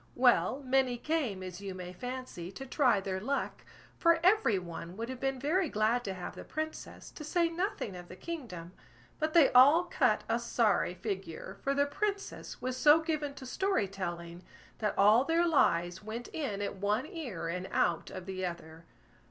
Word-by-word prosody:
Well, 255 +2 +3
many 255 -1 +2
came, 250 -10 -1
as 185 +1 -7
you 195 -2 -5
may 180 -1 -7
fancy, 245 -6 -6
to 270 - -7
try 255 -5 +3
their 190 -1 -3
luck, 275 +8 -2 0.4
for 335 -1 +5
every 375 - +4
one 175 0 -7
would 230 +2 -4
have 260 -1 -6
been 270 0 -1
very 320 +5 +1
glad 220 +3 +1
to 195 - -3
have 180 - -6
the - - -9
Princess, 315 0 -6
to 305 - -9
say 335 +2 +1
nothing 340 - -3
of 175 -1 -9
the 185 - -10
kingdom; 210 - -7 0.5
but 310 +1 -1
they 325 -5 +7
all 285 +7 +7
cut 250 -11 +1
a 230 +1 +1
sorry 225 -6 +1
figure, 190 -5 -5
for 275 0 0
the 285 0 +3
Princess 400 +7 -3
was 255 +1 -3
so 300 +3 +7
given 310 -3 -2
to 265 - -9
story 380 - 0
telling, 175 -3 -5 0.4
that 210 -1 -1
all 210 +5 +6
their 330 +3 +2
lies 175 - +2
went 225 +3 -6
in 210 -10 -3
at 200 - -4
one 210 +6 0
ear 290 - -5
and 180 +2 -3
out 170 - +1
of 185 -1 -7
the 190 -1 -5
other. 170 -2 -6
240 Hz, 185 wpm, -31 LUFS, 185-295 Hz, 0.5 s, they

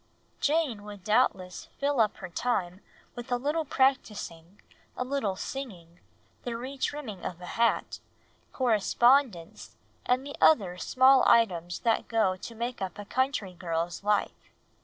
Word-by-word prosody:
Jane 290 -8 +1
would 205 -2 -10
doubtless 210 -4 +1
fill 280 -2 0
up 215 -2 +2
her 185 - -8
time 185 -3 -2 0.3
with 240 +1 -9
a 245 - +2
little 300 +5 -1
practising, 205 - -1 0.4
a - - -1
little 255 -8 -1
singing, 185 -9 -7 0.4
the 235 -2 -4
re 260 +4 -6
trimming 260 -8 -4
of 175 - -5
a 180 - -9
hat, 230 +5 0 0.5
correspondence, 240 -4 +1 0.3
and 255 +2 0
the 285 - -7
other 190 - +4
small 260 +4 +5
items 175 -7 +2
that 230 -1 +1
go 220 -5 +1
to 230 +5 -9
make 235 +1 -4
up 190 -1 -4
a 205 - -7
country 255 -6 -1
girl's 170 0 -3
life. 210 0 +1
225 Hz, 140 wpm, -28 LUFS, 185-260 Hz, 0.5 s, small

